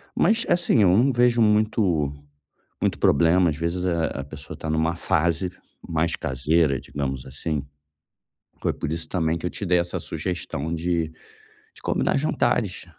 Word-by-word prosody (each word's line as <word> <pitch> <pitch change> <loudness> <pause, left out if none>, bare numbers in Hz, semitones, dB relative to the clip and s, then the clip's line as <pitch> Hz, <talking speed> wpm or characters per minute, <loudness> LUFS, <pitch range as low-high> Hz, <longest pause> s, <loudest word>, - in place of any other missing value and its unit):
Mas 225 +2 +3
assim 175 -10 +3
eu 90 -1 +5
não 130 +6 +4
vejo 120 -1 +3
muito 105 -9 +2 0.7
muito - - +1
problemas 85 +2 +4
às - - -12
vezes, 85 +2 -1
eh, 85 -3 0
a 70 - -4
pessoa 70 0 -9
tá 80 - -6
numa 80 +1 +1
fase 85 +2 +1 0.4
mais 80 +1 0
caseira, 70 +2 +1
digamos 65 -2 -4
assim. 70 +2 -3 1.0
Foi - - +1
por - - -4
isso 80 0 -3
também 80 -2 0
que 80 - -13
eu - - -1
te 100 - -5
dei 90 0 +3
essa 85 0 -2
sugestão 85 -4 -4
de 85 -1 -1 0.6
de - - -13
combinar - - +1
jantares, - - 0
85 Hz, 155 wpm, -24 LUFS, 80-90 Hz, 1.0 s, eu